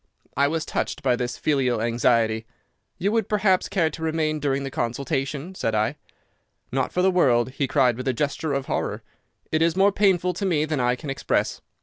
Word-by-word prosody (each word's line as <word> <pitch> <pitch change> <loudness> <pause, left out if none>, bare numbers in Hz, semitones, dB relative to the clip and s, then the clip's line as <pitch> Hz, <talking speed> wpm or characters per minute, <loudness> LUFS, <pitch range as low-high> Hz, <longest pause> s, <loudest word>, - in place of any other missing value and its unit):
"I 140 +1 +3
was 160 +1 -2
touched - - -3
by 125 -2 +3
this 120 0 -3
filial 130 -6 +1
anxiety. 115 -1 +1 0.5
'You 195 +3 0
would, 225 -2 0
perhaps, 200 -3 +2
care 170 -5 +1
to - - -9
remain 155 -1 0
during 140 -1 0
the 135 - -5
consultation?' 140 +7 -2
said 115 -11 -1
I. 110 +6 +1 0.8
"'Not - - 0
for 180 - 0
the 190 - +4
world,' 130 -9 +3
he 135 +1 -1
cried 125 -5 +2
with 130 - -5
a 130 - +2
gesture 145 +4 -2
of 135 -1 -1
horror. 110 -7 -2 0.5
'It 155 - +1
is 165 0 +3
more 195 +2 +4
painful 185 -3 +2
to 185 - -5
me 155 -4 +2
than 155 -2 -2
I 125 0 +2
can 135 +2 -6
express. 135 - -1
140 Hz, 200 wpm, -24 LUFS, 125-170 Hz, 0.8 s, the